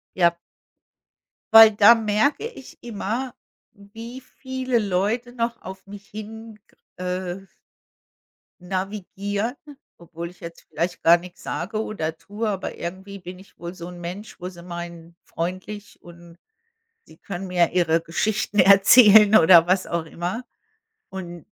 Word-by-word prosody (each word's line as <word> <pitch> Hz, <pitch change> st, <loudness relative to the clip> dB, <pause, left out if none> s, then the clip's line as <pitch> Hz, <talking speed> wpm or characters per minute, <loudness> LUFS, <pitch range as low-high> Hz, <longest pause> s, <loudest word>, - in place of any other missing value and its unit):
Ja. 170 Hz, -2 st, +3 dB, 1.2 s
Weil 225 Hz, 0 st, +11 dB
da 210 Hz, +2 st, +7 dB
merke 225 Hz, -, 0 dB
ich 270 Hz, -, -14 dB
immer, 235 Hz, +3 st, -4 dB, 0.4 s
wie 225 Hz, +5 st, -11 dB
viele 260 Hz, -1 st, -3 dB
Leute 210 Hz, +5 st, -1 dB
noch 235 Hz, -1 st, -3 dB
auf 190 Hz, +1 st, -10 dB
mich 200 Hz, 0 st, -12 dB
hin, 220 Hz, +1 st, -9 dB
g -, -, -30 dB, 0.3 s
äh 185 Hz, +1 st, -4 dB, 1.1 s
navigieren, 200 Hz, +4 st, -4 dB, 0.4 s
obwohl 170 Hz, 0 st, -8 dB
ich 180 Hz, -, -21 dB
jetzt 170 Hz, 0 st, -11 dB
vielleicht 175 Hz, +3 st, -3 dB
gar 170 Hz, +1 st, +6 dB
nix 175 Hz, +1 st, -13 dB
sage 215 Hz, +4 st, -3 dB
oder 160 Hz, -8 st, -4 dB
tue, 210 Hz, +6 st, -5 dB
aber 195 Hz, -2 st, -4 dB
irgendwie 190 Hz, +3 st, -7 dB
bin 180 Hz, -1 st, -10 dB
ich 190 Hz, -, -19 dB
wohl 175 Hz, +1 st, -7 dB
so 170 Hz, -1 st, -9 dB
'n 180 Hz, -1 st, -10 dB
Mensch, 185 Hz, +4 st, -8 dB
wo 180 Hz, -, -5 dB
sie 175 Hz, -2 st, -12 dB
meinen, 170 Hz, -1 st, -9 dB
freundlich 185 Hz, +5 st, -6 dB
und 170 Hz, 0 st, -15 dB, 0.7 s
sie -, -, -18 dB
können 195 Hz, -1 st, -7 dB
mir 175 Hz, -2 st, +1 dB
ihre 170 Hz, -2 st, +2 dB
Geschichten 210 Hz, +5 st, -2 dB
erzählen 205 Hz, +2 st, +7 dB
oder 165 Hz, 0 st, +7 dB
was 185 Hz, +1 st, +1 dB
auch 170 Hz, -1 st, -3 dB
immer 175 Hz, +9 st, -5 dB, 0.6 s
und 175 Hz, -3 st, -8 dB
190 Hz, 135 wpm, -23 LUFS, 175-215 Hz, 1.2 s, Weil